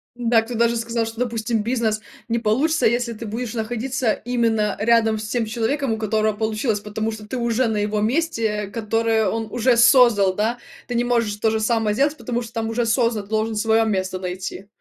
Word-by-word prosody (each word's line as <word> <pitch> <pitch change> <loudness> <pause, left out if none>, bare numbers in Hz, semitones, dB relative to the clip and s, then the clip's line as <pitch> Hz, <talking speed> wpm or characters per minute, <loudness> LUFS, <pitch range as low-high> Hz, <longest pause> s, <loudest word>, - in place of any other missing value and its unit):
Да, 235 -2 +2
кто 235 +2 -7
даже 235 +1 +2
сказал, 230 0 -1
что, 225 +1 -7
допустим, 230 -2 -1
бизнес 225 -2 0 0.3
не 235 0 0
получится, 265 +9 +1
если 235 0 +1
ты 225 - -8
будешь 230 +2 -4
находиться 240 +1 -1
именно 225 -3 0
рядом 225 0 +3
с 215 - -5
тем 230 0 -1
человеком, 240 +4 -1
у - - 0
которого 215 0 0
получилось, 220 0 -1
потому 215 +2 -3
что 215 -1 -9
ты 255 +4 -4
уже 235 +1 +1
на 220 -2 -1
его 210 0 0
месте, 250 +1 0 0.2
э, - - -12
которое 225 0 0
он 225 +2 -2
уже 245 +2 +2
создал, 235 -6 +5
да. 220 +5 -1 0.3
Ты 245 - -3
не 240 - +1
можешь 235 -4 +1
то 220 +1 +1
же 220 0 -1
самое 220 -1 +1
сделать, 285 +6 +1
потому 240 -1 -3
что 230 -1 -10
там 225 -1 -2
уже 230 +1 0
создан, 230 -2 +1
ты 200 - -20
должен 220 0 0
своё 225 +1 +3
место 190 -3 -1
найти. 185 +1 -6
225 Hz, 205 wpm, -22 LUFS, 215-240 Hz, 0.3 s, создал